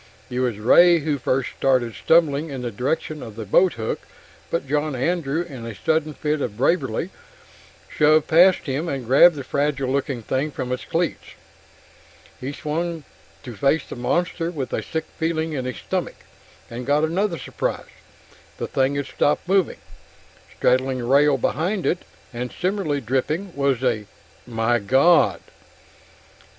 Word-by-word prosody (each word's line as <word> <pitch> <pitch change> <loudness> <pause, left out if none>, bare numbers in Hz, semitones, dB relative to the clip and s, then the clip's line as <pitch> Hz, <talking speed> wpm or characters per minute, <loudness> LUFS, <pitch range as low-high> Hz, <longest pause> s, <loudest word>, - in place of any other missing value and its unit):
It 125 - -2
was 125 -5 0
Ray 170 +11 +6
who 145 -1 -1
first 130 0 0
started 125 -4 +1
stumbling 160 0 +2
in 135 -3 -5
the 120 - -3
direction 145 +6 -2
of 110 -3 -9
the 110 -1 -6
boathook, 115 - +2 0.5
but 165 -4 -2
John 150 +1 0
Andrew, 160 +3 -1
in 135 -9 -9
a 115 -2 -6
sudden 155 +6 0
fit 150 -1 -1
of 105 -5 -3
bravery, 170 +6 0 0.8
shoved 155 0 +3
past 180 +3 +5
him 145 +5 -2
and 135 -4 -4
grabbed 140 +7 +6
the 140 - -5
fragile 140 -1 -1
looking 135 -3 -2
thing 135 +6 -1
from 130 -3 -5
its 125 - -3
cleats. 170 0 -2 1.0
He 130 +2 -4
swung 160 +2 -3 0.4
to 120 -3 -8
face 140 +7 +2
the - - -7
monster 165 +7 -1
with 140 -8 -5
a - - 0
sick 160 - -4
feeling 160 -1 -1
in 130 -3 -3
his 125 -2 -4
stomach, - - -3 0.5
and 120 +2 -7
got 145 +2 +3
another 170 +3 0
surprise. - - -3 0.7
The - - -3
thing 135 +1 0
had 140 -1 -2
stopped 145 +5 0
moving. 190 -2 +2 0.8
Straddling 130 +1 +2
the 125 - -4
rail 140 +3 +4
behind 175 - -1
it, 175 - 0 0.3
and 125 +1 -4
similarly 180 -6 -1
dripping, 150 - -2
was 140 -3 0
a 110 -5 0 0.4
migawd! 120 - +3
140 Hz, 150 wpm, -22 LUFS, 125-160 Hz, 1.0 s, Ray